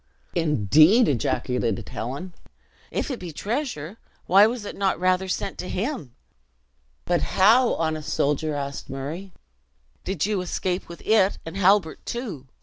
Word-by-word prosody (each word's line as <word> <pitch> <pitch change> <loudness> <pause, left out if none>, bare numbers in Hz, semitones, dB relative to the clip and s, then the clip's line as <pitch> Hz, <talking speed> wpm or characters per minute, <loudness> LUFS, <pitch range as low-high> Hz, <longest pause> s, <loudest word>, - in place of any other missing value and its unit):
"Indeed!" 155 - +4
ejaculated 120 -3 -1
Helen. 140 +10 -5 0.6
"If - - -2
it 255 - -4
be 175 -2 -7
treasure, 210 - -4 0.3
why 200 +3 +7
was 230 -2 -4
it - - -6
not 195 -4 0
rather 185 +1 +2
sent 195 +1 -3
to 180 - -5
him!" 190 - -3 0.9
"But - - +1
how, 230 +6 +4
honest 155 -2 -2
soldier," 150 +1 0
asked 140 -1 -5
Murray, 150 +8 -6 0.7
"did 190 -3 -1
you 205 -2 0
escape 180 0 -3
with 170 - -10
it, 205 -3 +3
and 165 +2 -7
Halbert, 195 -3 +3
too! 210 - -5
180 Hz, 140 wpm, -24 LUFS, 150-200 Hz, 0.9 s, why